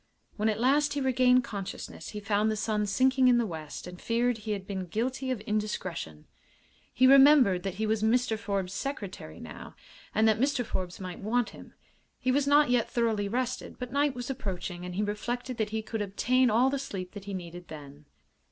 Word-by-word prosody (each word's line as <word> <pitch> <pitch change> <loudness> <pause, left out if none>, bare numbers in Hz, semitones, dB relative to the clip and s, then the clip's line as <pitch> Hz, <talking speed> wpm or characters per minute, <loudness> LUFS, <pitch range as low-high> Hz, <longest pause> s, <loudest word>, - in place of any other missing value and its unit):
When 215 +1 +1
at 215 - -1
last 290 +4 +3
he 290 - -1
regained 255 -1 +4
consciousness 200 -5 -6
he 210 - -6
found 205 +1 +1
the 215 - 0
sun 210 0 -1
sinking 260 +4 +3
in 245 -1 +6
the 235 - +2
west 160 -6 -7
and 180 0 -10
feared 235 0 +1
he 215 0 -3
had 195 -2 -5
been 190 -2 -4
guilty 255 +7 -2
of 250 -5 -2
indiscretion. 185 - -3 0.7
He 255 - +3
remembered 270 -8 +7
that 195 -1 -4
he 220 +2 -1
was 215 0 0
Mr. 230 +1 +2
Forbes's 200 -3 -3
secretary 200 - -5
now, 80 -3 -10 0.4
and 220 +1 +4
that 220 0 +3
Mr. 270 -1 +1
Forbes 180 -3 -4
might 185 -2 -6
want 230 +3 0
him. - - -13 0.4
He 255 - 0
was 280 +1 +1
not 290 -2 +5
yet 245 -2 +2
thoroughly 225 -4 0
rested, 245 +3 -3
but 250 0 -6
night 285 -1 +2
was 245 +2 -4
approaching 180 -7 -5
and 180 0 -6
he 205 - 0
reflected 240 +4 -3
that 220 -2 -1
he 220 0 -3
could 220 0 -4
obtain 245 +6 +2
all 245 +5 +3
the 280 - -1
sleep 190 -9 -6
that 205 -2 -9
he 200 -1 -4
needed 175 -1 -8
then. 145 -1 -11
220 Hz, 200 wpm, -29 LUFS, 195-250 Hz, 0.7 s, remembered